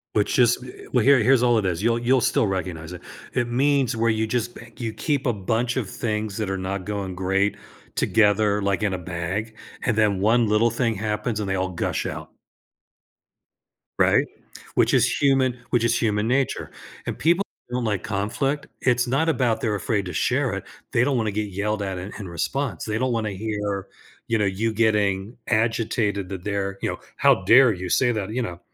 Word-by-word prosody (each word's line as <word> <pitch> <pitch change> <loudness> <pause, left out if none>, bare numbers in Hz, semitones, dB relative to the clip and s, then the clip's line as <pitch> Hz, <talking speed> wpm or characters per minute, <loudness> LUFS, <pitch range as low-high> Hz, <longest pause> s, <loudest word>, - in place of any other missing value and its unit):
Which 105 +4 +1
is, 120 -1 +5
eh, 125 - -11
well, 125 -4 +3
here 140 -1 +6
here's 125 +2 +4
all 120 -2 +4
it 105 - 0
is, 90 +2 -1
you'll, 115 0 +2
you'll 125 +1 +3
still 110 - +2
recognize 90 -3 -4
it, 90 - -9 0.3
it 120 -2 0
means 135 -1 +2
where 115 0 +2
you 110 0 +1
just 120 +1 -2
b - - -10 0.2
you 115 -3 -4
keep 145 -2 -1
a 120 - +2
bunch 115 +5 -1
of 115 -8 -2
things 105 -2 -3
that 105 -3 -2
are 95 - -1
not 95 0 -4
going 100 -3 -4
great 95 +2 +1 0.4
together, 105 -1 +3
like 100 +1 0
in 100 -3 0
a - - -1
bag, 90 +6 -4 0.3
and 110 -2 0
then 100 -3 +2
one 115 +2 +3
little 105 +3 +3
thing 115 -2 0
happens 105 +1 -2
and 100 - -3
they 95 - 0
all 95 0 0
gush 85 - -2
out. - - -6 1.7
Right? - - +4 0.5
Which - - +3
is - - +5 0.2
human 135 -3 +3
which 120 -1 +2
is 115 0 +2
human 105 -1 +1
nature, 130 +1 0 0.3
and - - -4
people 170 +5 +3 0.3
don't 125 -1 -1
like 105 -4 -1
conflict. 120 +8 -2
It's 125 -1 +2
not 140 +6 +1
about 120 -6 +1
they're 105 -2 0
afraid 100 -1 -1
to 90 - -5
share - - +1
it, - - -5 0.3
they 115 - +3
don't 135 -2 +1
wanna 110 -2 0
get 105 0 -2
yelled 105 +2 -1
at 95 -2 -3
in 95 +3 -6
in 100 - -6
response, 135 +10 -2
they 110 0 -1
don't 130 0 0
wanna 110 -2 -1
hear, 100 -1 -3 0.4
you 115 - +1
know, 105 - +1
you 110 +4 -1
getting 105 -1 +1
agitated 110 -3 0
that 95 -2 -6
they're, 100 -1 -2
you - - 0
know, - - -5 0.2
"How 95 - +4
dare 120 +4 +7
you 90 0 -5
say 125 -2 +3
that," 105 -3 -3
you 125 +2 -1
know, 90 -6 -5
110 Hz, 205 wpm, -24 LUFS, 100-120 Hz, 1.7 s, dare